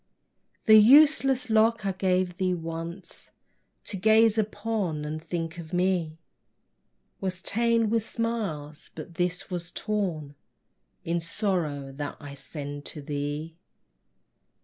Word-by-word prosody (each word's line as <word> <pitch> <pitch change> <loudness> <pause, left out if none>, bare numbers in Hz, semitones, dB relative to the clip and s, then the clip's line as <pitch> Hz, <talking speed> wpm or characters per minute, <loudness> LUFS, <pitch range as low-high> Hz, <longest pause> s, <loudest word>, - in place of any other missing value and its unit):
The 220 -1 +9
useless 270 +1 +6
lock 220 -1 +3
I 195 - +1
gave 185 -1 0
thee 185 -1 +1
once, 165 +2 -7 0.6
To 200 - -5
gaze 220 +2 +4
upon 205 -7 -2
and 155 +1 -5
think 165 0 -4
of 165 +1 -9
me, 180 -3 0 1.0
Was 185 -1 -3
ta'en 230 +3 +2
with 230 -1 +2
smiles, 205 -11 -4
but 160 +2 -8
this 180 +2 -2
was 175 -1 -4
torn 180 -11 -2 0.7
In 170 +1 0
sorrow 165 -7 -2
that 145 +1 -6
I 145 -2 -9
send 145 +1 -7
to 150 - -8
thee! 145 +3 -4
180 Hz, 120 wpm, -27 LUFS, 155-215 Hz, 1.0 s, The